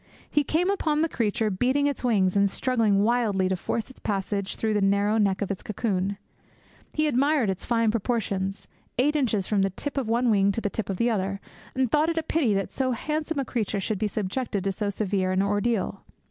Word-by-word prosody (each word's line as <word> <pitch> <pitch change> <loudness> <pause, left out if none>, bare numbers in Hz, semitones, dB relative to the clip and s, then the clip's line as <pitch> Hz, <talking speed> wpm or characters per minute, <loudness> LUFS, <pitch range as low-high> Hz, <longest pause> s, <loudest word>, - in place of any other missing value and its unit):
He 295 - +2
came 345 +7 +1
upon 310 -6 +1
the - - +2
creature 220 -5 0
beating 255 +9 +1
its 285 -2 -1
wings 200 -6 +2
and 200 0 +4
struggling 220 -4 +2
wildly 215 -5 +2
to 190 - +1
force 220 +4 -3
its - - -17
passage 200 -1 -2
through 220 -1 -1
the 205 - +1
narrow 200 +2 +2
neck 200 -1 +2
of 200 - -3
its 195 - -4
cocoon. 200 -2 -2 0.7
He 310 - +1
admired 280 -4 +2
its 190 - -6
fine 230 -2 +2
proportions, 200 -4 -2 0.3
eight 290 +5 +2
inches 225 -9 +1
from 205 -1 +1
the 195 - +2
tip 280 +10 -5
of 245 -5 -3
one 235 +1 +2
wing 200 -1 +4
to - - -1
the 205 - -2
tip 220 -3 -3
of 190 - -2
the 235 +3 +2
other, 195 -2 -1 0.4
and 260 -3 +1
thought 305 +2 +3
it 335 - -2
a 325 - +1
pity 280 -10 +1
that 195 -1 -2
so 260 -1 0
handsome 305 +5 -2
a 275 - 0
creature 215 -4 -2
should 200 +1 -2
be 215 - +1
subjected 210 0 -2
to 195 - 0
so 205 +1 -2
severe 195 -2 -1
an 185 +1 +2
ordeal. 205 +2 0
215 Hz, 215 wpm, -26 LUFS, 195-255 Hz, 0.7 s, and